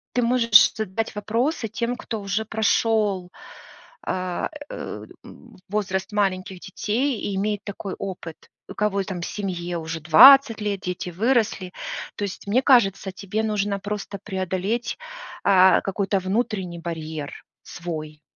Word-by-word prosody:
ты 250 - +3
можешь 235 -2 +6
задать 220 0 -3
вопросы 230 +5 -1
тем, 235 +3 -2
кто 220 -4 -5
уже 200 +2 -1
прошёл, 215 -3 +1 0.7
а, 185 -1 -2 0.2
э, - - -6 0.2
м, - - -15
возраст 190 -1 -2
маленьких 190 -2 -1
детей 220 +7 -1
и 200 - -3
имеет 205 +1 -1
такой 200 -1 -6
опыт. 180 -4 -6 0.3
У - - -8
кого 205 -1 0
и - - -5
там 180 -3 -5
семье 175 -3 -4
уже 160 0 -5
20 225 - +8
лет, 205 -2 -2
дети 180 -1 -4
выросли. 210 -2 0 0.4
То - - -4
есть, 195 - -7
мне 230 +6 +3
кажется, 195 -7 +4
тебе 200 +3 -3
нужно 205 -2 -1
просто 205 0 -5
преодолеть, 190 +4 -2 0.5
а, 190 -2 +6
какой-то 195 0 -1
внутренний 190 -3 -2
барьер 160 -3 -6 0.2
свой. 155 -3 -7
200 Hz, 135 wpm, -23 LUFS, 185-220 Hz, 0.7 s, 20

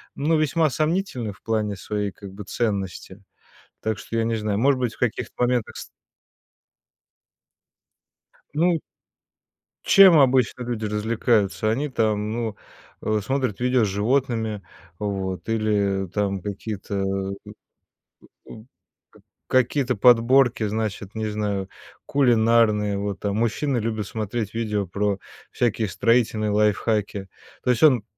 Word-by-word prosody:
ну, 155 +3 +1
весьма 155 +1 +2
сомнительны 155 - -1
в - - -23
плане 110 -2 -1
своей 105 +1 -3
как 100 0 -11
бы 105 - -8
ценности. 100 -3 -3 0.6
Так 110 -1 -2
что, 115 - -5
я 115 - +1
не 115 0 0
знаю, 105 -1 -1
может 135 +1 +3
быть, 120 -2 -2
в - - -25
каких-то 120 -2 -2
моментах 125 -2 0
с - - -8 2.7
Ну. 165 +1 +2 1.0
Чем 190 -5 +8
обычно 130 -2 +3
люди 120 -3 -3
развлекаются? 105 -2 +1
Они 140 +6 -1
там, 110 -3 0
ну, 115 -3 -3 0.5
э, 110 0 0
смотрят 130 -3 -2
видео 125 -2 +3
с - - 0
животными, 110 0 0 0.4
вот, 95 -3 -3
или 100 -3 0
там 100 0 -1
какие-то, 100 +1 -6 0.5
э, - - -9 1.0
у 110 0 -12 0.8
к - - -12
какие-то 130 0 +2
подборки, 120 +1 +4
значит, 105 -2 -3
не 110 0 -2
знаю, 100 -2 -2 0.4
кулинарные. 115 -5 +3
Вот, 100 -1 -3
там 100 0 -2
мужчины 120 +4 0
любят 110 -2 -2
смотреть 110 0 -4
видео 105 -4 -1
про 100 +1 -1 0.3
всякие 115 -2 0
строительные 110 +1 +1
лайфхаки. 105 -1 0 0.3
То - - -1
есть 120 +4 0
он 130 -8 +6
110 Hz, 125 wpm, -23 LUFS, 105-125 Hz, 2.7 s, Чем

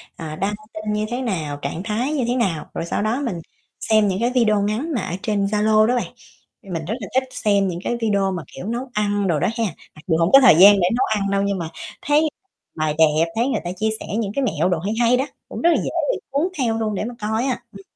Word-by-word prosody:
à, 155 -2 -6
đăng 195 +5 -1 0.2
tin 215 0 -3
như 210 0 0
thế 245 +2 -3
nào, 160 - -3
trạng 150 +6 -4
thái 230 +7 -1
như 270 -5 0
thế 245 - 0
nào. 190 -11 0
Rồi 165 - -3
sau 170 - -2
đó 225 +6 0
mình 185 -9 -3 0.4
xem 215 -1 +3
những 190 -1 -1
cái 240 +2 +1
video 215 -4 +3
ngắn 215 +11 -1
mà 235 - 0
ở 175 - -4
trên 205 -3 0
Zalo 215 +1 +3
đó 245 +3 +2
bạn. 245 - -1 0.5
Mình 170 -5 -5
rất 210 - -2
là 200 - -6
thích 260 - +4
xem 200 -4 +1
những 175 -2 -3
cái 240 - -1
video 200 -3 +1
mà, 180 -4 -4
kiểu, - - -8
nấu 240 +5 -3
ăn 205 -1 0
đồ 160 -4 +1
đó - - +1
ha, 230 - +1 0.3
mặc 150 - -14
dù 160 -3 +2
hông 165 +2 +2
có 275 - +9
thời 260 - +7
gian 195 +5 +9
để 175 - +3
nấu 260 +2 +2
ăn 200 0 -1
đâu 200 0 +1
nhưng 200 0 0
mà 165 -3 -4 0.3
thấy 300 +2 +2 0.5
bày 155 -1 0
đẹp, 160 0 +4
thấy 235 +3 +1
người 275 - -1
ta 175 - -3
chia 215 +4 -1
sẻ - - -7
những 215 -4 -1
cái 275 - +1
mẹo 175 - +1
đồ 175 -3 0
hay 200 +6 -2
hay 240 +1 +4
đó, 265 - 0 0.2
cũng - - -6
rất 340 - +4
là 340 - +4
dễ - - -2 0.2
bị - - -2
cuốn 285 +6 +1
theo 230 -5 0
luôn 215 -2 -1
để - - -2
mà 240 +1 -6
coi 220 +4 -1
á. 260 - -1
Ừm. 195 - -12
210 Hz, 270 wpm, -21 LUFS, 185-240 Hz, 0.5 s, có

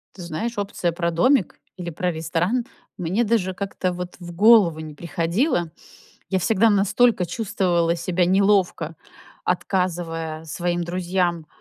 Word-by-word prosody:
Ты 190 - -10
знаешь, 175 +8 -4
опция 200 -3 -1
про 170 0 -1
домик 210 +7 +2 0.2
или 175 -2 -5
про 180 +2 -2
ресторан 170 +9 -1 0.3
мне 185 +6 0
даже 210 -5 +1
как-то 190 -1 -2
вот 180 0 -6
в 175 -1 -8
голову 200 -5 +6
не 155 -1 -7
приходило. 170 - -1 0.6
Я 190 - +1
всегда 220 +4 +3
настолько 205 +1 +3
чувствовала 175 -4 0
себя 175 +1 0
неловко, 190 -4 +2 0.5
отказывая 170 -4 -2
своим 175 +2 -2
друзьям, 175 -1 -1
180 Hz, 130 wpm, -23 LUFS, 170-200 Hz, 0.6 s, голову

